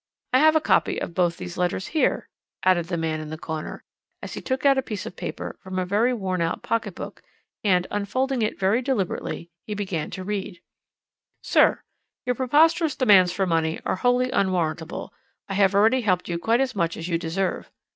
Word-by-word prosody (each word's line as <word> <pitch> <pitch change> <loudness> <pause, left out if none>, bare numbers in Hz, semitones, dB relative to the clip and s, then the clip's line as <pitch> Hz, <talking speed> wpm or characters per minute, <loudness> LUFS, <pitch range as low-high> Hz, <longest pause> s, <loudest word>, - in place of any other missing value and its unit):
I 255 - +6
have 315 +2 +5
a - - +6
copy - - +2
of - - -5
both 175 -1 +1
these 175 0 -7
letters 180 +1 -1
here," 310 - +1 0.4
added 175 -3 +3
the 175 -1 -2
man 160 -1 -1
in 155 -1 -7
the 155 - -5
corner, 160 -1 -6 0.4
as - - -6
he - - -6
took 260 +1 -2
out 275 -1 +5
a - - +1
piece 215 -5 -5
of - - -7
paper - - -6
from 190 -1 -6
a 185 - 0
very 210 +7 +2
worn 190 -6 -2
out 165 0 -1
pocket 225 -5 -1
book, - - -8 0.4
and, 180 -3 +3
unfolding 255 +6 -1
it 215 - -1
very 200 +6 +2
deliberately, 195 -8 -2 0.2
he 210 - -3
began 190 -6 -3
to 185 - -6
read: 200 -2 -4 0.8
"'Sir, - - +3 0.4
Your 250 - +1
preposterous 300 +6 +3
demands 200 -9 +5
for 190 +2 0
money 165 -2 0
are - - 0
wholly 245 +4 +2
unwarrantable. 170 -4 -1 0.3
I 195 - -4
have 195 0 +3
already 225 +6 +4
helped 185 -5 +1
you 170 -1 -2
quite 230 +8 +2
as 260 -3 -1
much 170 -3 0
as 165 - -5
you 170 -2 0
deserve. 180 +3 -2
195 Hz, 195 wpm, -24 LUFS, 175-245 Hz, 0.8 s, I